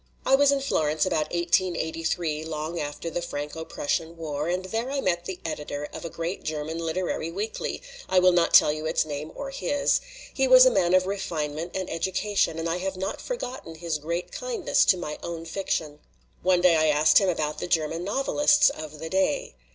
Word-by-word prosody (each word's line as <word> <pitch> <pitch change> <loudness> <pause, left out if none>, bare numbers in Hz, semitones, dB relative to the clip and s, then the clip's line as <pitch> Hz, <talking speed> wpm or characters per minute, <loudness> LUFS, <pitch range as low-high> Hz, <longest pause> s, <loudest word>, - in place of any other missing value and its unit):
"I - - +2
was 280 +1 +6
in 280 -1 +1
Florence 155 - +1
about 155 -4 -1
1883, 170 -2 0
long 160 +1 -4
after 150 +3 -4
the 175 - -2
Franco 150 -1 -5
Prussian 165 +2 -3
War, 150 -2 -3
and 180 +1 -1
there 225 +6 -2
I 280 0 -1
met 175 -7 0
the 185 -1 -5
editor 150 -2 -4
of - - -7
a 170 - -4
great 170 +3 -4
German 155 +1 -4
literary 165 0 -2
weekly 205 - -4 0.3
I 185 - +2
will 185 0 +6
not 175 -1 +2
tell 150 - +7
you 155 +1 -4
its 160 - +1
name 150 +1 -5
or 275 -1 -5
his. 280 +1 +1 0.3
He - - +1
was - - +9
a - - +6
man 175 - +3
of 185 0 +4
refinement 165 -4 -3
and 190 -1 -2
education, 190 +1 0
and 165 +1 -2
I 165 +1 -1
have 190 +1 -3
not 190 +2 -3
forgotten 255 - -6
his 160 -1 -3
great 170 +4 -4
kindness - - +1
to 185 - +4
my 150 -4 -5
own 165 -1 -6
fiction. 160 -4 -3 0.4
One 180 0 +3
day 175 -2 +5
I 155 0 +3
asked 150 0 +5
him 195 - +1
about 155 -3 -1
the - - -4
German 165 0 0
novelists 290 +7 +3
of 155 -1 -8
the 160 +2 -6
day. 190 - 0
170 Hz, 200 wpm, -26 LUFS, 155-190 Hz, 0.4 s, was